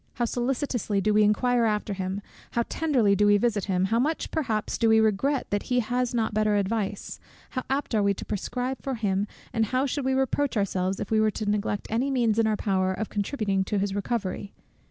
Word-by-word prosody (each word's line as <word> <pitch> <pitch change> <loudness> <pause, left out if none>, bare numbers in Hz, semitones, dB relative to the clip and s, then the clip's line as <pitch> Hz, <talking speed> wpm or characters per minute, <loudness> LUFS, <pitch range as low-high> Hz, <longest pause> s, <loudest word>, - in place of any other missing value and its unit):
How 240 - 0
solicitously 245 -3 -1
do 210 +2 +1
we 210 - +5
inquire 235 +3 +3
after 210 -1 0
him, 190 +1 -4 0.3
how 235 - +2
tenderly 250 -11 +2
do 205 +1 +3
we 205 0 +6
visit 210 -3 0
him, 185 -2 +1
how 225 +4 +1
much 305 +6 -1
perhaps 225 -9 -1
do 230 - +3
we 220 0 +6
regret 220 +6 +1
that 205 0 +1
he 250 0 +3
has 245 +1 0
not 225 -3 0
better 215 0 +2
advice, 205 0 -2 0.3
how 255 - -2
apt 270 -1 -1
are 215 - +3
we 200 0 +2
to - - -7
prescribe 250 +5 -3
for 270 -1 -3
him, 205 -2 0 0.3
and 225 -1 +2
how 255 +4 +1
should 285 +1 -2
we 265 0 +1
reproach 265 0 0
ourselves, 190 -1 0
if 205 - -5
we 220 - +4
were 215 - +4
to 215 +1 -4
neglect 205 0 -1
any 245 +5 +1
means 235 -5 +2
in 225 - +3
our 215 -1 +1
power 190 -2 +1
of 215 +2 -4
contributing 205 -2 -1
to 205 - -1
his 195 0 0
recovery! 200 -1 -3
215 Hz, 215 wpm, -26 LUFS, 200-245 Hz, 0.3 s, we